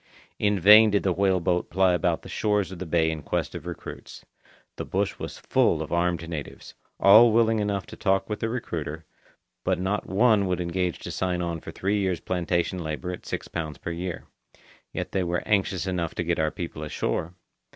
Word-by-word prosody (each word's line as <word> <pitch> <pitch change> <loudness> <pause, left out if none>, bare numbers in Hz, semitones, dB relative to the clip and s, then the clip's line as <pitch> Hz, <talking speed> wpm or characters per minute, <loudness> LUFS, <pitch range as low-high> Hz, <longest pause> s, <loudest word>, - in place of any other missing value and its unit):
In 105 -1 +2
vain 105 +4 +8
did 100 -1 +1
the 95 - +2
whale 95 0 +2
boat 90 0 0
ply 95 0 +3
about 90 - 0
the - - -10
shores 105 -3 0
of 95 - -8
the 95 - -5
bay 80 0 +2
in 80 -1 -5
quest - - -2
of - - -7
recruits. - - -8 0.5
The - - -3
bush 100 +1 -2
was - - -6
full - - +1
of - - -10
armed 85 -1 0
natives; 80 -4 -7 0.3
all 110 +4 +8
willing 115 0 +3
enough 100 -2 -1
to - - -10
talk 95 -1 +1
with 105 - -4
the 115 - -1
recruiter, 80 -9 -4 0.6
but - - +1
not 95 +3 -1
one 105 0 +3
would 90 -1 -1
engage 90 0 -1
to - - -6
sign 90 -1 -1
on 85 -1 -3
for - - -10
three 100 +2 -1
years' 95 -4 0
plantation 90 0 -1
labour 80 +2 -4
at 90 - -8
six - - -4
pounds 80 -4 -5
per 85 - -5
year. 85 0 -4 0.7
Yet - - -4
they 95 - 0
were 85 0 -1
anxious 95 -3 +1
enough 90 -3 -2
to - - -1
get 85 -1 -1
our 80 0 +2
people 85 -2 -6
ashore. 80 +2 -3
90 Hz, 205 wpm, -26 LUFS, 85-100 Hz, 0.7 s, vain